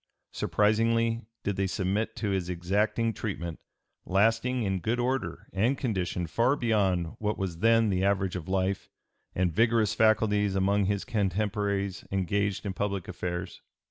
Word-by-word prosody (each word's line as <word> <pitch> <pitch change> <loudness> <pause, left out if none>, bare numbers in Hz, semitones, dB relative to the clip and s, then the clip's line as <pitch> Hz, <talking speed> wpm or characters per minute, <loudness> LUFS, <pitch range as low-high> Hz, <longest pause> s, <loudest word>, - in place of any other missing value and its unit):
Surprisingly 115 +2 +2 0.2
did 100 -2 -2
they 95 0 +1
submit 95 +3 -1
to 105 -3 -2
his 95 -2 -1
exacting 105 +6 0
treatment, 85 -7 -4 0.4
lasting 115 +5 +2
in 95 -2 0
good 110 +8 -1
order 120 -8 -2
and 115 +8 +1
condition 95 -8 -1
far 120 - +2
beyond 95 - +1
what 105 0 -1
was 90 -4 -3
then 115 +1 +4
the 95 0 0
average 95 -2 +1
of 90 0 -5
life 95 0 -1 0.5
and 90 -2 +1
vigorous 115 0 +3
faculties 105 -2 +3
among 100 +1 +2
his 100 0 -1
contemporaries 100 -1 -1
engaged 100 +1 0
in 100 - -2
public 100 -2 -2
affairs. 90 0 -5
100 Hz, 140 wpm, -28 LUFS, 95-110 Hz, 0.5 s, then